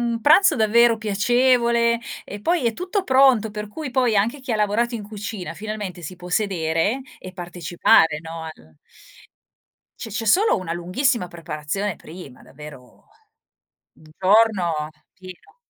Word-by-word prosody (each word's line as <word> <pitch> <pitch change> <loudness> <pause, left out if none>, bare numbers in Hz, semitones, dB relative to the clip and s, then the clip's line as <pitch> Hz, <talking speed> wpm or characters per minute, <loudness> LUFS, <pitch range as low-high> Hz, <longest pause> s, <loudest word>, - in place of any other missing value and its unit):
un 235 -1 -2
pranzo 310 - +5
davvero 230 +1 +4
piacevole, 235 +2 +2 0.3
e 205 - -9
poi 335 - 0
è 230 - +1
tutto 370 - -3
pronto 260 - +4
per 210 0 -6
cui, 295 +5 -7
poi, 245 -3 +1
anche 230 +8 0
chi 260 -2 -4
ha 220 - +1
lavorato 220 +3 0
in 220 - -5
cucina, 205 -2 -7
finalmente, 210 -4 -6
si 175 +3 -8
può 180 0 -11
sedere 180 +3 0 0.2
e 185 - -10
partecipare, 175 -3 +2
no, 165 0 -8
al 80 - -12 1.3
C'è 225 - -7
c'è 220 +3 -4
solo 395 - +3
una 180 -4 -5
lunghissima 180 +5 -1
preparazione 170 +3 -4
prima, 155 -6 -12
davvero, 140 -3 -14 0.9
un 155 - -20
giorno 185 -6 +2 0.2
pieno 185 - -14
210 Hz, 140 wpm, -22 LUFS, 175-235 Hz, 1.3 s, pranzo